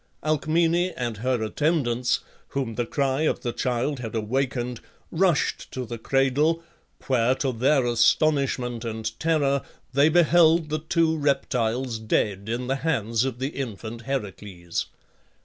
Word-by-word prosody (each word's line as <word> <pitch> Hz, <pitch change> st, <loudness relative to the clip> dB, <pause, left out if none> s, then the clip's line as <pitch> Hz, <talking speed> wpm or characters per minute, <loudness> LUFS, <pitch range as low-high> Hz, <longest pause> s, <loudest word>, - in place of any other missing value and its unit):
Alcmene 165 Hz, +4 st, +1 dB
and 120 Hz, -3 st, -3 dB
her 125 Hz, +1 st, 0 dB
attendants, 125 Hz, -1 st, 0 dB, 0.3 s
whom 130 Hz, -5 st, -3 dB
the 120 Hz, +1 st, -2 dB
cry 140 Hz, 0 st, 0 dB
of 155 Hz, -, 0 dB
the 120 Hz, -2 st, -3 dB
child 130 Hz, +3 st, -1 dB
had 115 Hz, -2 st, -6 dB
awakened, 125 Hz, +2 st, -1 dB, 0.3 s
rushed 170 Hz, -3 st, +1 dB
to 130 Hz, -1 st, -4 dB
the 120 Hz, 0 st, -6 dB
cradle, 135 Hz, +7 st, +1 dB, 0.4 s
where, 130 Hz, -1 st, +2 dB
to 135 Hz, -1 st, -1 dB
their 130 Hz, +3 st, +2 dB
astonishment 125 Hz, 0 st, +2 dB
and 110 Hz, -1 st, -4 dB
terror, 145 Hz, -4 st, +2 dB, 0.3 s
they 140 Hz, +3 st, +5 dB
beheld 165 Hz, -1 st, +4 dB
the 155 Hz, +1 st, -1 dB
two 160 Hz, +1 st, +1 dB
reptiles 130 Hz, -5 st, 0 dB
dead 105 Hz, -2 st, -1 dB
in 120 Hz, +2 st, -2 dB
the 135 Hz, +2 st, -1 dB
hands 115 Hz, -6 st, 0 dB
of 130 Hz, -3 st, -3 dB
the 130 Hz, +2 st, -2 dB
infant 115 Hz, -4 st, -6 dB
Heracles. 100 Hz, -9 st, -4 dB
130 Hz, 135 wpm, -25 LUFS, 115-150 Hz, 0.4 s, they